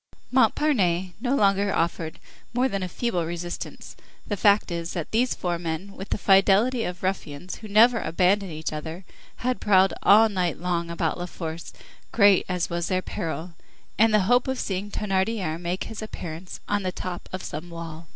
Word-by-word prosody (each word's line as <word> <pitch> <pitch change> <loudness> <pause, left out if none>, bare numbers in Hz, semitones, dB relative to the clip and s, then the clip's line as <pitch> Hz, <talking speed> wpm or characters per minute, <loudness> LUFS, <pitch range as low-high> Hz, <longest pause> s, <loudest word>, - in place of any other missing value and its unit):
Montparnasse 215 - +2
no 260 +2 +1
longer 200 -3 +3
offered 165 -2 -1 0.4
more 250 +1 +3
than 195 -6 -3
a 185 - -2
feeble 215 -4 -1
resistance; 175 +1 -6 0.3
the 205 - -2
fact 205 -1 +3
is, 170 0 -3
that 170 -4 -4
these 240 +3 +2
four 175 -2 -2
men, 170 +3 -4
with 195 - -8
the - - 0
fidelity 205 +5 +4
of 180 0 -6
ruffians 180 -3 -3
who 215 - -10
never 225 +3 +5
abandon 185 +4 +2
each 155 -1 -4
other, 160 +4 -6 0.4
had 255 0 0
prowled 190 -2 +4
all 220 +3 +7
night 185 -5 -1
long 170 -1 -2
about 170 -1 -1
La 175 - -3
Force, 165 -2 -6 0.4
great 200 -4 +5
as 180 -1 0
was 170 -1 -2
their 185 0 0
peril, 165 +1 -4 0.5
in 225 +1 +6
the 215 -1 +4
hope 245 +7 +3
of 265 0 -1
seeing 195 +1 -3
Thénardier 190 -4 -1
make 175 +2 -2
his 225 - -7
appearance 175 -4 -7
on 205 0 0
the 185 -1 -2
top 180 -1 -6
of 185 - -5
some 155 +4 -6
wall. 165 -1 -8
185 Hz, 180 wpm, -25 LUFS, 170-210 Hz, 0.5 s, all